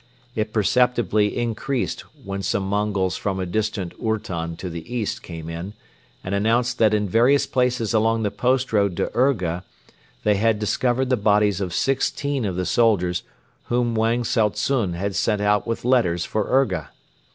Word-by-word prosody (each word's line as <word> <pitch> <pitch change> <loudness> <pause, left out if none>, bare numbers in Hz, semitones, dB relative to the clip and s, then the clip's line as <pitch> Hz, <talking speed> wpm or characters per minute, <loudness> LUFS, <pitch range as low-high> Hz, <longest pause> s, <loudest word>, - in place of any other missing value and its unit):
It 110 -2 -2
perceptibly 110 0 +2
increased 120 +2 -2 0.2
when 100 0 -4
some 100 0 -1
Mongols 100 -2 0
from 95 -2 -2
a 95 - -1
distant 100 -1 -2
ourton 85 -7 -2
to 95 - -6
the 85 +5 -7
east 120 -4 -2
came 80 -2 -8
in 85 +4 -6 0.5
and 90 - -4
announced 120 +5 +1
that 110 -1 +4
in 105 -1 0
various 120 +8 +4
places 125 -3 0
along 115 +1 +2
the 100 - 0
post 130 0 0
road 100 -4 +2
to - - -1
Urga 95 -10 +1 0.6
they 105 -1 +3
had 110 +1 +2
discovered 125 +5 0
the 130 - +3
bodies 105 -2 +2
of 90 -2 -2
sixteen 135 +3 0
of 95 -3 -2
the 90 0 -1
soldiers 95 -7 +2 0.4
whom 120 -1 0
Wang 115 +2 +1
Tsao 110 -2 +2
tsun 105 -6 -1
had 100 +3 -2
sent 105 -2 +1
out 105 +1 +1
with 115 0 -3
letters 100 -10 +2
for 110 -2 -2
Urga. 100 - +1
105 Hz, 165 wpm, -23 LUFS, 95-120 Hz, 0.6 s, that